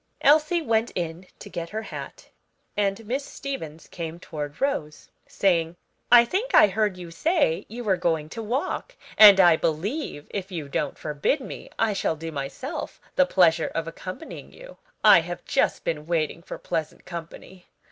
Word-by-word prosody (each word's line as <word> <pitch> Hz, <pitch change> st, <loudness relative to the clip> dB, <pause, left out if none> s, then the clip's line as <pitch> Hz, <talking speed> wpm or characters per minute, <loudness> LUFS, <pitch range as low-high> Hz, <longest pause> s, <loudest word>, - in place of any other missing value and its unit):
Elsie 310 Hz, +4 st, +4 dB
went 225 Hz, -3 st, +1 dB
in 170 Hz, +1 st, -4 dB
to -, -, -11 dB
get 170 Hz, -1 st, -5 dB
her 220 Hz, +1 st, -4 dB
hat, -, -, -9 dB, 0.5 s
and 205 Hz, +1 st, -1 dB
Miss 260 Hz, +6 st, -2 dB
Stevens 165 Hz, -, -7 dB
came 170 Hz, -1 st, -6 dB
towards 150 Hz, -4 st, -6 dB
Rose, 210 Hz, -, -2 dB, 0.2 s
saying, 170 Hz, -3 st, +1 dB, 0.4 s
"I 240 Hz, -1 st, +9 dB
think 420 Hz, -, -1 dB
I -, -, +9 dB
heard 205 Hz, -1 st, 0 dB
you 175 Hz, -2 st, -9 dB
say 295 Hz, -, +1 dB
you 240 Hz, +3 st, -6 dB
were 195 Hz, -4 st, +2 dB
going 165 Hz, -4 st, 0 dB
to 225 Hz, -, -6 dB
walk; 260 Hz, -, -3 dB, 0.2 s
and 205 Hz, -2 st, +9 dB
I 175 Hz, -3 st, +7 dB
believe, 165 Hz, -, -2 dB
if 195 Hz, -1 st, -5 dB
you 160 Hz, -5 st, -5 dB
don't 140 Hz, 0 st, -2 dB
forbid 150 Hz, -, -1 dB
me, 260 Hz, -, -9 dB
I 225 Hz, -2 st, +2 dB
shall 180 Hz, -4 st, -1 dB
do 165 Hz, +1 st, -6 dB
myself 145 Hz, -, -5 dB, 0.2 s
the 275 Hz, -, +4 dB
pleasure 170 Hz, -6 st, +4 dB
of 165 Hz, 0 st, -2 dB
accompanying 185 Hz, -, -8 dB
you. -, -, -13 dB, 0.3 s
I -, -, +8 dB
have -, -, -7 dB
just -, -, +1 dB
been 150 Hz, -1 st, -3 dB
waiting 165 Hz, -1 st, -1 dB
for -, -, -8 dB
pleasant 160 Hz, -1 st, -4 dB
company. 170 Hz, +1 st, -9 dB
185 Hz, 165 wpm, -25 LUFS, 160-235 Hz, 0.5 s, I